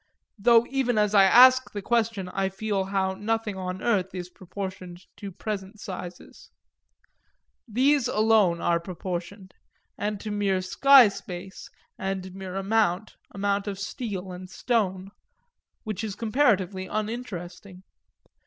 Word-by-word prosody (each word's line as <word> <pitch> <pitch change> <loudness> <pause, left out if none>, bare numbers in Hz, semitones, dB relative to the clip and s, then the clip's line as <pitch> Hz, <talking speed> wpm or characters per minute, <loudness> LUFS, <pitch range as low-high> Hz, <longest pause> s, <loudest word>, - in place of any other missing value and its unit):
though 235 +2 +5
even 255 -4 0
as 210 -1 +2
I 200 -2 +7
ask 255 +5 +7
the 205 - -4
question 225 -4 0
I 190 +1 -1
feel 195 0 -2
how 190 -1 -1
nothing 210 +1 -2
on 185 0 -5
earth 190 -5 0
is 180 0 -6
proportioned 185 -1 -8
to 200 -1 -7
present 200 +1 -6
sizes. 180 -4 -9 1.2
These 260 +4 +2
alone 215 -5 +3
are 170 0 +2
proportioned 185 +2 -6 0.5
and 210 0 -2
to 215 - -6
mere 195 -2 0
sky 270 +6 +7
space 190 -1 -9 0.3
and 190 -1 -4
mere 190 -1 -7
amount, 195 0 0
amount 200 +1 -1
of 200 -1 -3
steel 195 -3 -5
and 180 +1 -9
stone; 195 -4 -1 0.7
which 215 -2 -4
is 210 -3 -4
comparatively 205 -6 +1
uninteresting. 200 -4 -6
195 Hz, 125 wpm, -26 LUFS, 185-220 Hz, 1.2 s, I